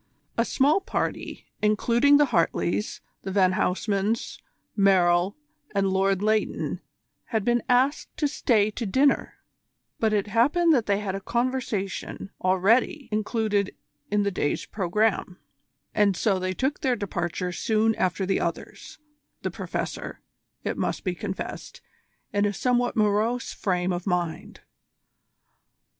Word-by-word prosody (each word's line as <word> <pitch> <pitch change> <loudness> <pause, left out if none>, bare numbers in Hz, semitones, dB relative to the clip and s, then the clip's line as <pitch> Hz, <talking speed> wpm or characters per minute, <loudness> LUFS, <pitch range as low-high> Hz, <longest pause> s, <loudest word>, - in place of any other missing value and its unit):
A 230 - +2
small 290 +11 +3
party, - - -3 0.2
including 235 +6 +4
the 295 - +5
Hartleys, 170 +4 0 0.2
the - - -5
Van 185 -1 +3
Huysmans, 200 +4 -1 0.4
Merrill, 185 -1 +3 0.4
and 195 -1 +2
Lord 195 +1 +1
Leighton, 215 0 0 0.4
had 220 -4 -2
been 240 0 +2
asked 260 +4 +1
to 300 - +2
stay 215 -7 +2
to 225 +1 -4
dinner, 270 +7 +2 0.6
but 220 -1 +2
it 205 -2 +1
happened 295 +11 +3
that 240 -6 +1
they 200 -1 +2
had 195 -2 -3
a 195 - -3
conversazione 235 -5 -2
already 205 - +2
included 215 -2 0 0.3
in 205 0 +2
the 200 - 0
day's 145 -5 -1
programme, 200 -1 0 0.6
and 200 -3 +3
so 195 -4 +1
they 185 0 -2
took 270 +7 -1
their 260 -4 +1
departure 180 -4 -3
soon 220 +4 +1
after 190 -1 0
the 190 0 +1
others, - - -5 0.5
the - - -1
Professor, - - -5 0.4
it - - -3
must - - -2
be 185 - -1
confessed, 190 +2 -6 0.5
in 205 0 +2
a 205 - 0
somewhat 245 +3 +1
morose 215 +3 +1
frame 180 -1 0
of 175 +2 -4
mind. 175 -3 -2
210 Hz, 130 wpm, -26 LUFS, 190-235 Hz, 0.6 s, the